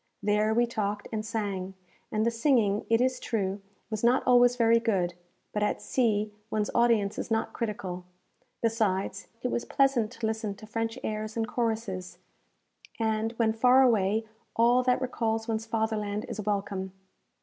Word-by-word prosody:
There 210 Hz, +1 st, +2 dB
we 240 Hz, +2 st, +3 dB
talked 210 Hz, -3 st, -3 dB
and 215 Hz, -1 st, -2 dB
sang, 200 Hz, -4 st, -3 dB, 0.4 s
and 215 Hz, +1 st, +1 dB
the 235 Hz, -, +2 dB
singing, 230 Hz, -4 st, +2 dB
it 230 Hz, +1 st, +4 dB
is 255 Hz, 0 st, +1 dB
true, 200 Hz, -3 st, -2 dB, 0.3 s
was 215 Hz, 0 st, -3 dB
not 245 Hz, +3 st, +4 dB
always 245 Hz, 0 st, +5 dB
very 230 Hz, -1 st, +4 dB
good; 195 Hz, -7 st, 0 dB, 0.4 s
but 210 Hz, -, -1 dB
at 210 Hz, -, 0 dB
sea 215 Hz, -4 st, 0 dB, 0.2 s
one's 215 Hz, -1 st, -1 dB
audience 230 Hz, -4 st, +2 dB
is -, -, -4 dB
not 225 Hz, 0 st, 0 dB
critical. 205 Hz, -6 st, -4 dB, 0.6 s
Besides, 220 Hz, -4 st, 0 dB, 0.2 s
it 250 Hz, -, 0 dB
was 235 Hz, -, -1 dB
pleasant 270 Hz, -5 st, +2 dB
to 235 Hz, -2 st, -4 dB
listen 220 Hz, -2 st, -2 dB
to 215 Hz, -, -12 dB
French 225 Hz, +1 st, -3 dB
airs 215 Hz, +1 st, -3 dB
and 225 Hz, -1 st, 0 dB
choruses; 220 Hz, -7 st, -2 dB, 0.8 s
and, 220 Hz, 0 st, 0 dB
when 225 Hz, -1 st, +1 dB
far 250 Hz, +3 st, +5 dB
away, 220 Hz, -2 st, +2 dB, 0.3 s
all 240 Hz, +2 st, +4 dB
that 250 Hz, 0 st, +2 dB
recalls 225 Hz, -3 st, -1 dB
one's 225 Hz, 0 st, -2 dB
fatherland 220 Hz, -2 st, -1 dB
is 215 Hz, -, -4 dB
welcome. 195 Hz, -2 st, -2 dB
220 Hz, 160 wpm, -28 LUFS, 210-235 Hz, 0.8 s, always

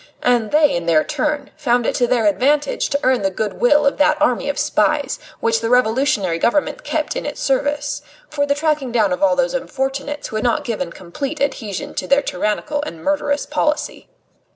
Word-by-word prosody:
And 240 Hz, -3 st, +2 dB
they, 300 Hz, -1 st, +4 dB
in 170 Hz, -1 st, -3 dB
their 155 Hz, -2 st, +4 dB
turn, 295 Hz, -2 st, -2 dB
found 245 Hz, -3 st, +1 dB
it -, -, +1 dB
to 245 Hz, -, +1 dB
their 235 Hz, -3 st, +1 dB
advantage 280 Hz, +8 st, +1 dB
to 280 Hz, -, 0 dB
earn 255 Hz, -3 st, +3 dB
the 195 Hz, -, +1 dB
good 205 Hz, +2 st, -4 dB
will 295 Hz, +4 st, +4 dB
of 280 Hz, -, +2 dB
that 305 Hz, +1 st, +3 dB
army 280 Hz, -2 st, +1 dB
of 285 Hz, -, -2 dB
spies, -, -, +1 dB, 0.2 s
which 225 Hz, 0 st, +2 dB
the 225 Hz, -, -1 dB
Revolutionary 230 Hz, -7 st, +2 dB
Government 295 Hz, -, 0 dB
kept -, -, -2 dB
in -, -, -3 dB
its -, -, -5 dB
service, 285 Hz, +2 st, -1 dB, 0.3 s
for 285 Hz, -7 st, -1 dB
the 280 Hz, -, +2 dB
tracking 295 Hz, -4 st, 0 dB
down 215 Hz, -5 st, +2 dB
of -, -, -4 dB
all 300 Hz, +12 st, +4 dB
those -, -, +1 dB
unfortunates 275 Hz, -, -3 dB
who 215 Hz, -, -3 dB
had 215 Hz, -, -2 dB
not 245 Hz, +5 st, +1 dB
given 210 Hz, -8 st, -3 dB
complete 265 Hz, -, -6 dB
adhesion 220 Hz, -8 st, -3 dB
to 185 Hz, -, -4 dB
their 280 Hz, +5 st, +3 dB
tyrannical 210 Hz, +10 st, -2 dB
and 170 Hz, -, -7 dB
murderous 290 Hz, 0 st, 0 dB
policy. 300 Hz, 0 st, -2 dB
270 Hz, 200 wpm, -19 LUFS, 220-295 Hz, 0.3 s, they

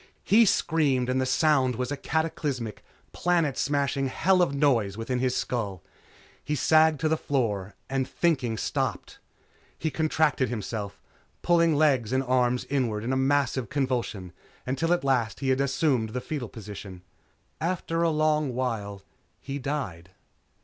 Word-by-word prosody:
He 225 Hz, +3 st, +5 dB
screamed 140 Hz, -9 st, +1 dB
and 130 Hz, +1 st, +1 dB
the 130 Hz, -, 0 dB
sound 135 Hz, -4 st, +3 dB
was 125 Hz, +2 st, -3 dB
a -, -, 0 dB
cataclysmic, 140 Hz, -7 st, -2 dB, 0.3 s
planet 170 Hz, -6 st, +1 dB
smashing 140 Hz, -1 st, 0 dB
hell 185 Hz, +7 st, +2 dB
of 175 Hz, -, +2 dB
noise 120 Hz, -9 st, +2 dB
within 125 Hz, +2 st, -2 dB
his 130 Hz, 0 st, 0 dB
skull. 100 Hz, -8 st, -3 dB, 0.6 s
He 150 Hz, -, -1 dB
sagged 155 Hz, 0 st, +4 dB
to 160 Hz, -, +2 dB
the 160 Hz, -, +2 dB
floor 105 Hz, -10 st, -2 dB
and 135 Hz, -1 st, -1 dB
thinking 130 Hz, -10 st, 0 dB
stopped. -, -, -3 dB, 0.6 s
He 160 Hz, -, -2 dB
contracted 155 Hz, -5 st, +1 dB
himself, 105 Hz, -3 st, -5 dB, 0.4 s
pulling 170 Hz, -2 st, +4 dB
legs 135 Hz, -7 st, +2 dB
and 130 Hz, +1 st, +1 dB
arms 125 Hz, -1 st, +1 dB
inward 120 Hz, -7 st, -1 dB
in 125 Hz, +3 st, -1 dB
a -, -, +1 dB
massive 135 Hz, -3 st, +1 dB
convulsion 120 Hz, -9 st, -2 dB, 0.3 s
until 135 Hz, +6 st, -1 dB
at 175 Hz, -, +2 dB
last 125 Hz, -7 st, 0 dB
he 135 Hz, -, -1 dB
had 130 Hz, +1 st, +2 dB
assumed 135 Hz, -4 st, +1 dB
the 125 Hz, -, -1 dB
foetal 135 Hz, -7 st, -5 dB
position. 100 Hz, -4 st, -9 dB, 0.6 s
After 165 Hz, -1 st, -1 dB
a 170 Hz, -, +3 dB
long 155 Hz, -4 st, +1 dB
while, 105 Hz, -6 st, -3 dB, 0.4 s
he 140 Hz, +1 st, -5 dB
died. 125 Hz, -, -4 dB
130 Hz, 150 wpm, -27 LUFS, 120-155 Hz, 0.6 s, He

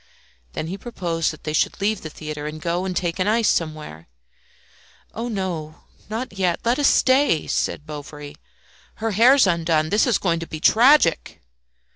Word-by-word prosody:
Then -, -, -4 dB
he 185 Hz, +5 st, -6 dB
proposed 175 Hz, -8 st, -2 dB
that 155 Hz, -, -9 dB
they 155 Hz, -, -4 dB
should -, -, 0 dB
leave 205 Hz, +1 st, -1 dB
the 160 Hz, -, -7 dB
theatre 150 Hz, -1 st, -7 dB
and 155 Hz, +1 st, -7 dB
go 175 Hz, +3 st, -2 dB
and 185 Hz, -1 st, -3 dB
take 175 Hz, -1 st, -2 dB
an 185 Hz, -, +1 dB
ice 225 Hz, +1 st, +2 dB
somewhere. 155 Hz, -, -3 dB, 1.1 s
"Oh, 230 Hz, +3 st, -4 dB, 0.8 s
not 225 Hz, +1 st, -4 dB
yet; 185 Hz, -3 st, 0 dB
let 240 Hz, +4 st, +1 dB
us 290 Hz, -, +4 dB
stay," 260 Hz, -, +3 dB
said 150 Hz, -, -2 dB
Bovary. 150 Hz, -1 st, -9 dB, 0.6 s
"Her 225 Hz, 0 st, -3 dB
hair's 245 Hz, +6 st, +5 dB
undone; 165 Hz, -3 st, +1 dB
this 215 Hz, +5 st, +3 dB
is 235 Hz, -, +3 dB
going 170 Hz, -3 st, -1 dB
to 165 Hz, -, -7 dB
be 155 Hz, -, -7 dB
tragic." 230 Hz, -, +3 dB
175 Hz, 165 wpm, -22 LUFS, 155-220 Hz, 1.1 s, hair's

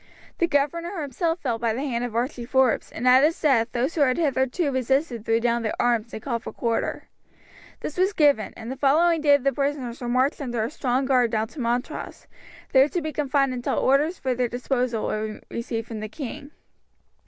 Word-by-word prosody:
The 340 Hz, -, +3 dB
governor 335 Hz, +5 st, -1 dB
himself 325 Hz, +3 st, -1 dB
fell 235 Hz, -4 st, -1 dB
by 230 Hz, -1 st, 0 dB
the 260 Hz, -, -3 dB
hand 240 Hz, -3 st, -2 dB
of 240 Hz, -2 st, -4 dB
Archie 245 Hz, +1 st, -2 dB
Forbes, 260 Hz, 0 st, +1 dB
and 245 Hz, -, -3 dB
at 255 Hz, +2 st, +7 dB
his 320 Hz, +2 st, +2 dB
death 245 Hz, -6 st, +2 dB
those 255 Hz, +6 st, -1 dB
who 315 Hz, -, -1 dB
had 255 Hz, -3 st, +3 dB
hitherto 280 Hz, 0 st, 0 dB
resisted 260 Hz, -2 st, 0 dB
threw 225 Hz, 0 st, +2 dB
down 235 Hz, 0 st, +1 dB
their 220 Hz, -, -3 dB
arms 235 Hz, -1 st, +1 dB
and -, -, -6 dB
called 235 Hz, -4 st, -2 dB
for -, -, -7 dB
quarter. 230 Hz, -1 st, -2 dB, 0.7 s
This 305 Hz, -, -5 dB
was 380 Hz, +2 st, +3 dB
given, 285 Hz, -, +3 dB
and 230 Hz, +2 st, -7 dB
the 265 Hz, -, -5 dB
following 320 Hz, +4 st, +3 dB
day 290 Hz, -2 st, +6 dB
the 275 Hz, 0 st, 0 dB
prisoners 275 Hz, -4 st, -2 dB
were 240 Hz, -, -3 dB
marched 260 Hz, +5 st, +1 dB
under 240 Hz, -5 st, -2 dB
a 230 Hz, -, -3 dB
strong 260 Hz, -2 st, 0 dB
guard 255 Hz, -3 st, +3 dB
down 220 Hz, 0 st, -1 dB
to 300 Hz, -, -11 dB
Montrose, 240 Hz, +1 st, -3 dB, 0.5 s
there 270 Hz, +2 st, +5 dB
to 355 Hz, -, -1 dB
be 310 Hz, -2 st, -4 dB
confined 275 Hz, -2 st, +1 dB
until 245 Hz, -1 st, -2 dB
orders 295 Hz, +6 st, +2 dB
for 260 Hz, -1 st, -1 dB
their 245 Hz, -1 st, -1 dB
disposal 245 Hz, -2 st, -1 dB
were 215 Hz, 0 st, -3 dB
received 230 Hz, -1 st, -4 dB
from 225 Hz, -2 st, -6 dB
the 215 Hz, 0 st, -5 dB
king. 285 Hz, +1 st, -7 dB
260 Hz, 205 wpm, -24 LUFS, 235-290 Hz, 0.7 s, at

